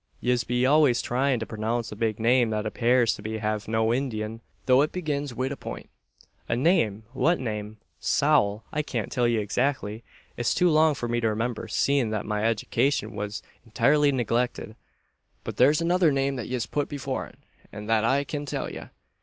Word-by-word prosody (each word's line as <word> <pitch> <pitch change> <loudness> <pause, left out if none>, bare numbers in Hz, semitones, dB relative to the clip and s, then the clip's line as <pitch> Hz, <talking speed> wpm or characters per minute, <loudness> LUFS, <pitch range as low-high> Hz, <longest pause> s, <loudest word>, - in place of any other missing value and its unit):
Yez 125 -1 +1
be 125 +1 0
always 145 -3 +4
tryin' 130 0 0
to 110 - -4
pronounce 115 +2 -3
a - - -6
big 110 0 -1
name 120 +1 +3
that 105 -1 -2
appares 120 +2 +2
to 110 +1 -5
have 105 -1 -2
no 110 +1 +1
indin', 115 -4 -3 0.3
though 130 +1 +5
it 150 - +1
begins 145 -7 -3
wid 130 +3 -2
a - - -3
point!" - - -8 0.6
"A 115 - +1
name! 115 - +2
What 170 +6 +2
name?" 105 -3 -4 0.2
"Sowl! 120 -8 +2
I 150 - 0
kyan't 120 -8 -4
till 120 -2 +1
ye 120 -1 +1
exakly. 110 0 -1 0.3
It's 120 - 0
too 180 -1 +3
long 155 -1 +4
for 120 - -4
me 120 0 0
to 115 -1 +1
remimber, 115 +1 -2
seein' 140 -5 +1
that 110 -1 -3
my 105 0 -2
edicashun 115 +2 0
was 105 +1 -5 0.2
intirely 145 +6 +3
neglicted. 120 -3 -1 0.7
But - - -6
there's 145 +6 +4
another 175 -1 +3
name 135 0 0
that 120 - -5
yez 125 -2 -1
phut 145 +5 -2
before 135 -2 -4
it; - - -19 0.3
an 105 - -8
that 110 0 +2
I 135 +5 +2
kyan 145 0 -5
tell - - -3
ye. - - -8
120 Hz, 185 wpm, -26 LUFS, 110-140 Hz, 0.7 s, though